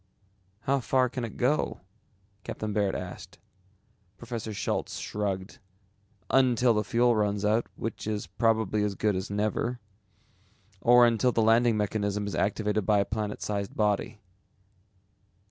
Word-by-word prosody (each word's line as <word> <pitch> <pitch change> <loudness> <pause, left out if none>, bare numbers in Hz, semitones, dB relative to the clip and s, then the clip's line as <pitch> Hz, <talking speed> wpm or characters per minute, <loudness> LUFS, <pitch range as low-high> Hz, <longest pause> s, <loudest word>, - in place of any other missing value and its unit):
"How 135 +3 +1
far 130 +1 +2
can 125 0 -4
it 115 - -6
go?" 140 +5 0 0.6
Captain 110 -1 -4
Baird 100 -2 +1
asked. 90 -1 -7 0.8
Professor 115 -1 -5
Schultz 105 - -2
shrugged. 100 +2 -4 0.7
"Until 125 -2 +4
the 105 -1 +1
fuel 120 +4 +2
runs 105 -1 0
out, 110 +3 +2
which 115 -1 -5
is 105 -1 -2
probably 110 +2 +1
as 105 -1 -1
good 105 -1 +1
as 95 +1 -3
never, 110 +4 -1 1.0
or 120 0 +7
until 120 +2 +2
the 115 - +1
landing 115 0 +4
mechanism 105 -1 -1
is 100 - -4
activated 105 0 0
by 105 +2 +3
a 100 - +2
planet 105 0 -4
sized 100 -2 -3
body." 105 0 0
110 Hz, 135 wpm, -28 LUFS, 105-120 Hz, 1.0 s, or